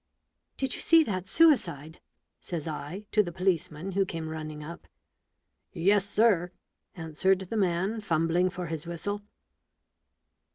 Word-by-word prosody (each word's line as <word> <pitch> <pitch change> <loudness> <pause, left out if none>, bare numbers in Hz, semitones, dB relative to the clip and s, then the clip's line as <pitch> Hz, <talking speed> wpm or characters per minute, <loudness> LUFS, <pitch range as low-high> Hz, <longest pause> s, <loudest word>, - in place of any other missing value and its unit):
"Did 265 -2 -1
you - - -4
see 330 -1 +6
that 185 - -3
suicide?" 170 - +2 0.4
says 165 -3 -5
I 155 +6 -6
to 210 - +5
the 175 -4 -4
policeman 180 -1 -1
who 195 +1 +2
came 165 -4 -5
running 155 -1 -6
up. 170 +3 -9 0.9
"Yes, 195 +3 +2
sir/' 205 -4 +3 0.5
answered 170 +3 +1
the 190 +4 -5
man, 190 +3 0
fumbling 170 -1 +1
for 180 0 -5
his 160 -1 -5
whistle. 190 +5 -3
180 Hz, 130 wpm, -28 LUFS, 160-200 Hz, 0.9 s, see